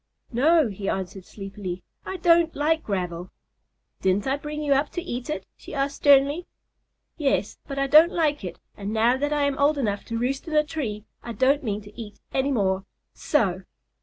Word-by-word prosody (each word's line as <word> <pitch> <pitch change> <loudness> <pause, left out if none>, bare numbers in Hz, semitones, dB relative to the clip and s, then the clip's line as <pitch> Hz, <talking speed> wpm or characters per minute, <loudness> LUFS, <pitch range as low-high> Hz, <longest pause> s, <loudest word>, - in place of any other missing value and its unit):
"No," 305 +4 +4
he 195 0 -4
answered 190 0 -4
sleepily, 195 -3 -7 0.2
"I 380 - -3
don't 335 -1 +4
like 315 +2 +1
gravel." 180 -3 -3 0.7
"Didn't 190 +2 +2
I 265 - +1
bring 300 +1 -5
you 285 -1 +3
up 280 +2 +1
to 350 - -2
eat 250 -7 -5
it?" 305 - -3
she - - -10
asked 280 +1 -1
sternly. 285 +4 +4 0.7
"Yes, 275 - 0
but 275 - -5
I 275 - +2
don't 310 +5 +7
like 300 - 0
it, 175 -2 -6 0.2
and 205 0 -5
now 225 +3 +3
that 290 +2 -1
I 295 -1 +1
am 280 0 0
old 290 +1 +3
enough 205 -7 -1
to 230 - -3
roost 265 +6 -2
in 315 - -3
a 300 - +5
tree 235 -10 -4 0.2
I 235 - -6
don't 270 +6 +2
mean 210 -3 -2
to 210 +3 -10
eat 210 -2 -10
any 270 +1 +1
more. 195 -5 +1 0.3
So!" 195 - +1
270 Hz, 195 wpm, -25 LUFS, 205-295 Hz, 0.7 s, don't